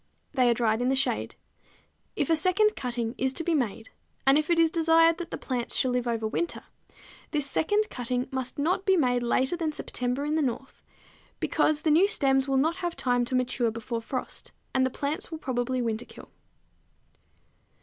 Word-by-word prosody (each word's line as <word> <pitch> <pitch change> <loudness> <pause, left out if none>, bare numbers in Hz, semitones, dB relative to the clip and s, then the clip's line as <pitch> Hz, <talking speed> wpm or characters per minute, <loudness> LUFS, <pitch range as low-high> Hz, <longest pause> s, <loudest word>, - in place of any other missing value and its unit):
They 255 -3 +3
are - - +5
dried 225 -1 +1
in 250 - +1
the 270 - +2
shade. 270 - 0 0.8
If - - 0
a - - +6
second 380 +6 +2
cutting 240 -2 -3
is 265 0 0
to 330 - -2
be 340 - 0
made, 230 -6 -2 0.3
and 270 +1 +6
if 305 +2 +1
it 340 - +3
is 330 -1 +4
desired 330 0 +4
that 345 -1 -5
the - - -5
plants 245 -3 -3
shall 255 - +2
live 245 0 -1
over 230 -2 -1
winter, 340 +10 -3 0.7
this 295 -3 -1
second 415 +9 +1
cutting 250 0 -2
must 260 -1 -4
not 360 +7 0
be 385 -1 +3
made 245 -5 +2
later 260 +6 +1
than 325 -3 -1
September 250 -1 -3
in 300 - -1
the 315 - +2
North, 265 0 -4 0.6
because 305 0 +1
the 315 - +3
new 345 +6 +5
stems 270 -8 +2
will 270 -1 +1
not 320 +6 +1
have 350 -2 -3
time 245 -1 +1
to 255 - -2
mature 250 -1 +1
before 230 +1 -4
frost, 250 +2 -5 0.2
and 260 0 +3
the - - -3
plants 285 +4 -3
will 320 - -5
probably 255 -3 -2
winterkill. 230 0 -5
265 Hz, 190 wpm, -27 LUFS, 245-320 Hz, 0.8 s, a